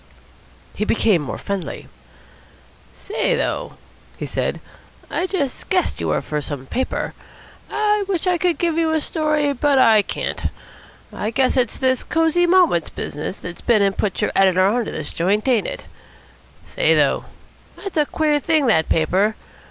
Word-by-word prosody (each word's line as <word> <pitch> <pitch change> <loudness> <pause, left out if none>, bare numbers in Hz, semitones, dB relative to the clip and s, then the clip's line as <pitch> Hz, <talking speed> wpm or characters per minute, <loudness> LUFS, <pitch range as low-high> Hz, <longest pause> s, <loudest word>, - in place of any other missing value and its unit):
He 210 - -2
became 210 -5 +2
more 145 - -5
friendly. 200 -3 -5 1.1
"Say, 445 +4 -1
though," - - -2 0.4
he - - -4
said, - - -2 0.5
"I 365 - -1
just 290 -9 -3
guessed 370 -1 0
you - - -1
were - - 0
from 150 -1 -3
some 140 -2 -6
paper. 260 - -2 0.6
I 420 -1 +1
wish 375 -4 -1
I 360 -2 +2
could 355 -1 +1
give 335 -2 0
you 325 -1 +2
a 315 - +2
story, 305 -2 0
but 280 +1 +2
I 225 -4 +6
can't. - - -4 0.7
I 210 - -2
guess 260 +3 +1
it's 250 -4 +1
this 260 -1 +1
Cosy 330 +1 +2
Moments 345 - +3
business 150 +6 -5
that's 175 -1 -9
been 220 -4 +3
and 195 -1 +1
put 200 -4 -1
your - - +1
editor 185 -1 +4
on 230 +4 +1
to - - -5
this 155 - -5
joint, 200 +7 0
ain't 240 -5 +2
it? - - -6 0.8
Say, - - +2
though, - - +2 0.5
that's 395 -2 -7
a 300 -2 +2
queer 300 -2 +1
thing, 310 -1 +2
that 160 -10 +2
paper. 190 +7 +2
260 Hz, 165 wpm, -21 LUFS, 200-330 Hz, 1.1 s, I